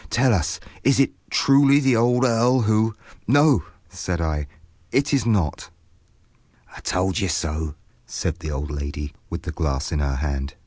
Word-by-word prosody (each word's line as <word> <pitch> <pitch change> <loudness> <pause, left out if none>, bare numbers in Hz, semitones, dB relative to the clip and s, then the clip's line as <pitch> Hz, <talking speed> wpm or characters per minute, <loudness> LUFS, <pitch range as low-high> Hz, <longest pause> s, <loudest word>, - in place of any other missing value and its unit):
Tell 125 +4 +3
us, 85 -7 -1 0.2
is 135 +2 +3
it 135 - +3 0.2
truly 140 0 +5
the 135 -3 +3
old 125 +2 +3
earl 120 +2 +3
who—" 110 0 +2 0.3
"No," 140 - +4 0.2
said 90 0 -4
I, 75 -3 -2 0.4
"it 140 +3 +1
is 135 -4 +2
not." 95 -9 0 1.1
"I - - -10
told 95 +3 -1
you 100 - 0
so," 80 -2 -2 0.3
said 85 +2 -3
the 80 -2 -6
old 75 0 -4
lady, 70 0 -5 0.2
with - - -5
the - - -4
glass 70 -3 -2
in 75 - -1
her 70 -2 -1
hand. 70 -1 -3
90 Hz, 165 wpm, -23 LUFS, 75-125 Hz, 1.1 s, truly